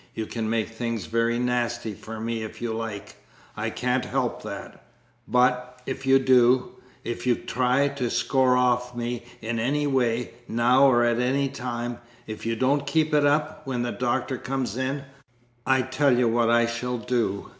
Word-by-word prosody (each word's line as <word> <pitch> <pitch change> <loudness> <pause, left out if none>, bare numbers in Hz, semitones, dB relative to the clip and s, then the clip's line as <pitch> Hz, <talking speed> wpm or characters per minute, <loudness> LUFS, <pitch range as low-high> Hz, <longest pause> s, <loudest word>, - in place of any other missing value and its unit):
You 110 - -3
can 110 0 -3
make 110 -1 0
things 115 -3 -3
very 115 +4 +1
nasty 120 -2 -1
for 110 +3 -8
me 115 0 -3
if 110 - -7
you 120 -1 -2
like. 110 -3 -6 0.4
I - - -2
can't - - 0
help - - -2
that - - -8 0.4
but, 125 0 +1
if 135 0 -5
you 135 0 +7
do 130 -1 +4 0.3
if 120 +2 -4
you 120 - +4
try 130 +4 +1
to 140 -4 -2
score 125 +2 +2
off 125 -1 +1
me 120 0 -3 0.2
in 115 +1 -2
any 145 +6 0
way, 125 -4 0 0.2
now 125 +4 +4
or 120 -2 +4
at 120 0 +2
any 135 +2 +1
time 120 -1 -4 0.3
if 110 +1 -6
you 115 - 0
don't 140 +4 +1
keep 155 +1 +1
it 145 -1 +4
up 150 +1 0
when 125 -2 -1
the 120 - -2
Doctor 125 +1 -1
comes 130 -5 -3
in 135 +2 -2 0.6
I 130 -1 +4
tell 130 0 +2
you 125 -1 +3
what 115 0 +2
I 120 0 +4
shall 120 +1 -3
do. 115 -4 -1
125 Hz, 175 wpm, -25 LUFS, 115-130 Hz, 0.6 s, you